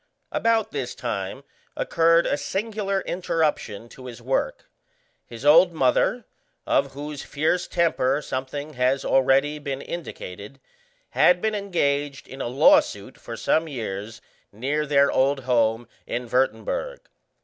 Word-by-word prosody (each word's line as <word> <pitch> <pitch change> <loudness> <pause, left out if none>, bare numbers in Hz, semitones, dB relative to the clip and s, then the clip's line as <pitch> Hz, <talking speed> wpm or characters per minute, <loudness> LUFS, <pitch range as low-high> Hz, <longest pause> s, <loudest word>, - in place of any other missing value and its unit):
About 225 -1 +1
this 135 -4 -4
time 115 +2 -4 0.3
occurred 165 0 +3
a - - +1
singular 200 +4 -2
interruption 155 - -2
to 130 +1 -11
his 120 -1 -9
work. 130 +3 -2 0.6
His 120 +3 -9
old 170 +4 +7
mother, 160 - +1 0.4
of 135 - +1
whose 145 +1 -6
fierce 155 +5 -1
temper 150 -6 +1
something 140 +3 -5
has 130 +1 +1
already 135 +3 +3
been 140 -2 -4
indicated, 135 - -8 0.5
had 180 0 +4
been 220 +3 0
engaged 145 -8 -1
in 135 +1 -8
a - - -2
law 125 +3 +6
suit - - -7
for - - -9
some 160 +1 +1
years 110 -5 -6 0.3
near 145 +8 -2
their 140 -1 +4
old 135 +1 +2
home 115 -2 +1 0.2
in 120 0 -3
Würtemberg. - - -1
140 Hz, 130 wpm, -24 LUFS, 125-165 Hz, 0.6 s, old